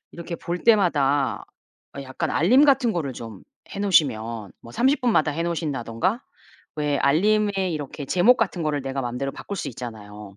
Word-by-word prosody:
이렇게 170 0 -7
볼 175 +1 -4
때마다 145 - +2 0.6
약간 130 -1 -4
알림 250 - +4
같은 265 -5 +3
거를 145 -6 -3
좀 115 -5 -9 0.3
해 200 - -4
놓으시면 115 - +1
뭐 115 - -13
30 250 - +1
마다 155 -6 +2
해 165 +3 -2
놓으신다든가 165 - -2 0.5
왜 145 -2 0
알림에 205 +9 +2 0.2
이렇게 145 -1 -5
제목 185 - +4
같은 190 -7 -1
거를 150 -2 -1
내가 135 0 -4
마음대로 125 +2 -3
바꿀 200 - -7
수 - - -4
있잖아요. 105 -5 -9
150 Hz, 330 characters per minute, -23 LUFS, 130-195 Hz, 0.6 s, 알림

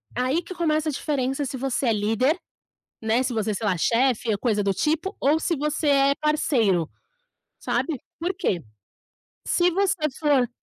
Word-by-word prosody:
Aí 255 +7 +1
que 370 - -9
começa 315 -2 0
a - - 0
diferença, 270 -1 -1
se 265 - -5
você 265 0 -1
é 230 - +3
líder, 225 - +1 0.6
né, 225 +3 +2
se 255 -1 -2
você, 220 -1 -1
sei 215 - -4
lá, 185 - +2
chefe, 235 +1 +2
coisa 210 0 0
do 195 - +1
tipo, 320 - -1
ou 300 +4 +3
se 335 - 0
você 300 +2 -1
é 275 0 +4
parceiro. 235 - +1 0.7
Sabe 300 -7 -1 0.2
por 355 +3 -1
quê? 185 - -1 0.8
Se 355 0 +3
você 380 -2 0 0.2
for 285 -5 +3
270 Hz, 165 wpm, -24 LUFS, 225-310 Hz, 0.8 s, é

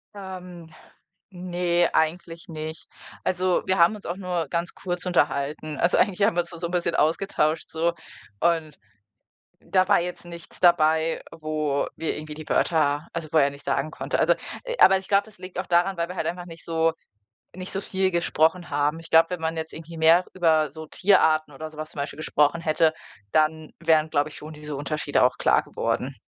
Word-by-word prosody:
Ähm. 180 -4 -9 0.6
Ne, 175 -1 0
eigentlich 165 +1 -1
nicht. 155 0 -7 0.4
Also, 185 0 +1
wir 190 - +1
haben 170 +5 +5
uns 210 - -12
auch 175 +2 -4
nur 180 -4 -2
ganz 170 +1 -2
kurz 180 -1 -3
unterhalten. 150 -2 0
Also, 170 - +3
eigentlich 200 -1 +2
haben 200 -4 +3
wir 175 - +3
uns 170 - -6
da 170 - -8
so 170 - -2
'n - - -9
bisschen 170 -1 0
ausgetauscht, 160 0 +1
so, 165 +1 0 0.5
und 165 -3 +1 0.8
da 185 -1 +2
war 200 - +5
jetzt 180 +1 -5
nichts 170 -1 -11
dabei, 160 -2 +3 0.2
wo 155 -2 -1
wir 165 - -2
irgendwie 155 0 -7
die 155 0 -9
Wörter 150 -1 +1
also, 170 -2 -4
wo 160 - +4
er 140 -1 +4
nicht 140 0 -14
sagen 140 +3 -1
konnte. - - -3
Also, - - +4 0.4
aber 190 0 +7
ich 190 0 -9
glaube, 200 0 +3
das 220 -3 -17
liegt 185 0 -7
auch 185 - -3
daran, 180 +2 +2
weil 170 0 -1
wir 180 - -6
halt - - -2
einfach 175 0 -4
nicht 165 -1 -11
so 165 -1 +1 0.6
nicht 185 +1 -5
so 195 - -2
viel 190 -1 0
gesprochen 170 0 +1
haben. 145 +2 0
Ich 165 - -13
glaube, 165 0 +6
wenn 180 - -3
man 160 0 -1
jetzt 160 0 -5
irgendwie 165 +1 -9
mehr 165 +3 +5
über 160 -5 +2
so 160 +1 -9
Tierarten 155 -5 +3
oder 155 +3 -6
so 155 - -15
was 155 0 -5
zum - - -11
Beispiel 140 - -4
gesprochen 155 +1 +1
hätte, 160 0 +2 0.4
dann 155 0 +1
wären, 155 -1 +3
glaube 145 0 +1
ich, - - -9
schon 155 +1 -9
diese 150 -1 -7
Unterschiede 145 +1 0
auch 125 - +3
klar - - +3
geworden. - - -3
165 Hz, 200 wpm, -25 LUFS, 155-180 Hz, 0.8 s, aber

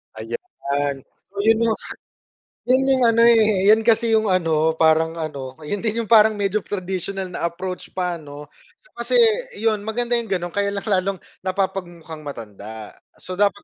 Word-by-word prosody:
Ayan. 145 - -4 0.3
So, 200 - -6
'yon 225 +1 +4
'yong 220 - 0 0.9
'yon 260 +1 +4
'yong 260 -2 +3
ano, 230 0 +3
eh, 215 -4 +5
'yan 220 - +5
kasi 230 0 +4
'yong 220 -1 +3
ano, 160 -3 +2
parang 160 0 +3
ano, 140 -5 -6
'yon 200 +7 -3
din 230 +1 -1
'yong 220 - -13
parang 220 -1 +6
medyo 200 0 0
traditional 190 0 -4
na 170 - -1
approach 180 +2 -6
pa, 180 -2 -2
'no? 145 -1 -10 0.4
So, - - -25
kasi, - - 0 0.4
iyon 220 -2 0
maganda 240 +2 -1
'yong 230 - -5
gano'n, 175 -2 -2
kaya 200 0 0
lang 200 - -4
lalong 195 -2 0 0.2
napapag-mukhang 180 -4 -4
matanda. 110 -6 -9 0.2
So, 185 - -7
dapat 205 0 +1
190 Hz, 165 wpm, -21 LUFS, 160-220 Hz, 0.9 s, parang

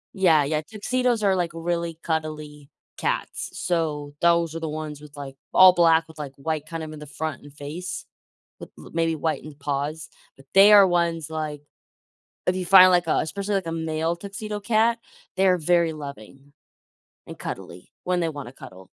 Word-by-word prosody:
Yeah, 165 -6 +4
yeah, 150 +2 -1
tuxedos 230 +4 -1
are, 195 -1 +3
like, 175 -2 -1
really 170 -1 -2
cuddly 155 -3 -4 0.3
cats. - - -2
So, 150 -4 -2
those 170 -1 +3
are - - -3
the 160 -1 -4
ones 150 -1 -6
with, 150 -1 -14
like, 135 -1 -8 0.2
all 185 -1 +8
black 165 -2 +4
with, 160 -1 -15
like, 140 -2 -6
white 155 +1 -3
kind 165 0 -5
of 155 0 -7
in 150 - -9
the 150 - -10
front 155 0 -5
and 145 - -14
face 155 +6 -6 0.5
with - - -10
l - - -13
maybe 165 0 +1
whitened 155 -2 -4
paws. 145 +2 -3 0.3
But 135 - -18
they 200 +2 +8
are 200 -2 +8
ones, 170 -3 0
like 155 -2 -4 0.9
If 180 - +2
you 185 -1 -3
find, 185 0 +9
like, 175 -1 +3
a - - +2
especially 200 +5 -2
like 185 -4 -1
a - - -3
male 160 +1 -1
tuxedo 205 +3 -6
cat, 230 +2 +2 0.4
they're 190 -1 +4
very 170 0 +2
loving 140 -1 -10 0.8
and - - -9
cuddly 90 +1 -8
when 180 0 0
they 165 - 0
wanna 145 -6 -7
cuddle. 95 -6 -13
160 Hz, 180 wpm, -24 LUFS, 150-180 Hz, 0.9 s, find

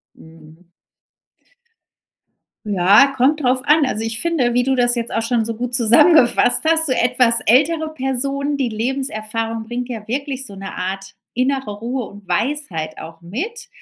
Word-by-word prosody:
Mhm. 160 +2 -18 2.0
Ja, 205 +6 +5
kommt 285 +5 +2
drauf 255 -1 +2
an. 300 -1 +4
Also, 220 -3 -3
ich 225 0 -1
finde, 305 -8 0
wie 245 - +2
du 265 +1 0
das 245 -1 +2
jetzt 235 0 -4
auch 225 - -1
schon 230 -1 0
so 230 - -4
gut 245 +2 -5
zusammengefasst 240 +2 +5
hast, 320 0 +3
so 275 - 0
etwas 245 -1 +2
ältere 310 +6 +2
Personen 275 +1 -2
die 265 -4 -1
Lebenserfahrung 225 -2 -3
bringt 240 +2 -5
ja 220 -3 -7
wirklich 265 +1 -4
so 205 - -10
'ne 195 0 -8
Art 195 +1 -5 0.2
innere 260 -2 -1
Ruhe 245 +2 -4
und 205 -2 -14
Weisheit 175 - -3
auch 165 0 -11
mit. 415 - -6
245 Hz, 155 wpm, -19 LUFS, 215-275 Hz, 2.0 s, Ja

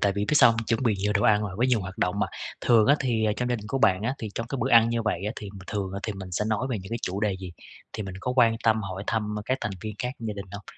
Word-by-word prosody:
tại 100 -1 +3
vì 100 +1 -1
biết 150 - 0
sao 120 - +8
hông? 115 0 -1
Chuẩn 115 +2 0
bị 115 -4 +2
nhiều 105 +1 0
đồ 100 - +1
ăn 105 -1 +4
rồi, 95 -2 -4
với 125 +3 +2
nhiều 120 -4 +2
hoạt 95 0 -7
động 90 +2 0
mà, - - +2 0.3
thường 115 -3 +4
á 145 - +6
thì, 115 -4 +1
ờ, 105 - +2
trong 125 0 -1
gia 120 - +1
đình 105 -1 -9
của 135 +4 -1
bạn 95 -4 +3
á, 125 +4 0
thì 110 - -4
trong 115 - -3
cái 135 +1 -4
bữa 130 - 0
ăn 115 -1 +7
như 115 -1 0
vậy 105 -3 -1
á 105 - -1
thì 105 - -6 0.2
thường 100 -3 -3
thì 110 - -2
mình 95 -2 -8
sẽ 105 +4 0
nói 110 +4 0
về 115 - -1
những 95 +2 -10
cái 115 - -2
chủ 95 +2 -2
đề 105 -3 0
gì? 90 -2 -7 0.4
Thì 110 - -4
mình 95 -2 -7
có 125 - -2
quan 115 -2 +5
tâm 110 -1 +3
hỏi 95 0 -5
thăm 105 -2 -1
các 130 +1 0
thành 105 - -2
viên 110 -1 -5
khác 125 +5 -2
trong 115 -2 -5
gia 105 - -3
đình 100 -1 -7
hông? 100 - -7
110 Hz, 340 wpm, -26 LUFS, 100-115 Hz, 0.4 s, sao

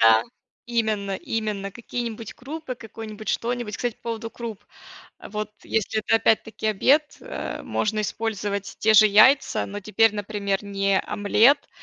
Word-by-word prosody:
Да. 115 0 +6 0.4
Именно 215 -4 0
именно 210 -2 -3
какие-нибудь 235 0 -5
крупы, 280 0 -6
какой-нибудь 220 -2 -9
что-нибудь, 235 -2 -2
кстати, 240 -2 -2
по - - -39
поводу 230 -1 -4
круп, 225 -4 -7 0.5
а - - -11
вот 210 0 -4
если 220 0 -1
это 220 - +3
опять-таки 225 0 +1
обед, 275 +9 +2
э, - - -6
можно 215 0 -1
использовать 205 -2 -3
те 220 0 +4
же 215 0 +8
яйца, 235 +7 +5
но 205 +1 -6
теперь, 215 +2 +3
например, 205 -1 -2
не 195 -1 +1
омлет, 230 +8 +3
215 Hz, 140 wpm, -24 LUFS, 205-230 Hz, 0.5 s, же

